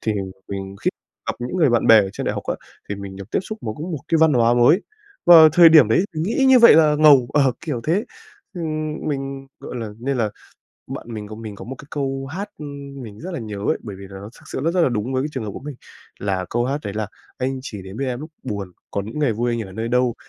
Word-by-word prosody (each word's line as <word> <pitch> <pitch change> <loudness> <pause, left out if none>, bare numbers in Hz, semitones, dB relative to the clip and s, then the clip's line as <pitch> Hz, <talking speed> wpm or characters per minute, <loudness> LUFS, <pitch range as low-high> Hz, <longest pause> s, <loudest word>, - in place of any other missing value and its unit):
Thì 110 - 0 0.4
mình 95 0 -6
khi - - +3 0.4
gặp - - 0
những 125 +9 -4
người 155 -8 +4
bạn 120 - +2
bè 115 - +9
ở 95 -2 -2
trên - - -5
đại - - +1
học - - -4
á - - -1 0.3
thì 100 - -2
mình 100 -1 -8
được 100 +2 -10
tiếp - - +1
xúc 215 +3 -7
với 110 -2 -4
một 160 -2 -4
cái 165 - +3
văn 160 -1 +5
hóa 120 -2 +4
mới, 125 - +5 0.5
và 165 -2 +10
thời 170 -1 +8
điểm 155 -8 +7
đấy 115 - +3
mình 155 - -2
nghĩ 225 +9 +1
như 260 -1 +8
vậy 235 - +9
là 155 -2 +5
ngầu. 140 -6 +6
Ờ, 135 -3 +3
kiểu 150 -8 -3
thế. 185 +8 +1 0.5
Ừm, 155 -3 -3
mình, 135 -1 -4
gọi - - -7
là 115 -2 -4
nên 135 +3 -2
là 110 -4 0 0.6
bạn - - -7
mình 105 -1 -6
có 110 - -8
mình 110 -2 -7
có - - -9
một 130 - -6
cái - - -11
câu 135 -2 -3
hát 195 +5 -5 0.5
mình 105 -3 -10
rất 185 +3 -6
là 170 - -3
nhớ 105 -2 -6
ấy 100 - 0
bởi 100 -3 -7
vì 100 - -10
là 95 -1 -9
nó 105 +2 -9
thực - - -19
sự - - -2
rất 165 - +3
rất 180 - +3
là - - +4
đúng 120 +1 -2
với 130 - +1
cái 145 - -2
trường 130 -6 -4
hợp 105 - -4
của - - -8
mình. 145 -1 -7 0.4
Là 95 -2 -1
câu 120 +1 0
hát 140 +3 -1
đấy 100 - -4
là 110 -1 -2 0.3
"Anh 130 +1 -2
chỉ 105 -7 -7
đến 95 +3 -9
bên 135 0 -2
em 125 +1 -3
lúc 155 +1 -8
buồn, 100 -6 -5 0.2
còn 100 0 -3
những 115 +7 -6
ngày 145 -6 +2
vui 120 +3 -1
anh 115 - -2
ở - - -12
nơi 110 +4 -3
đâu?" 125 -1 +2
125 Hz, 275 wpm, -21 LUFS, 110-155 Hz, 0.6 s, và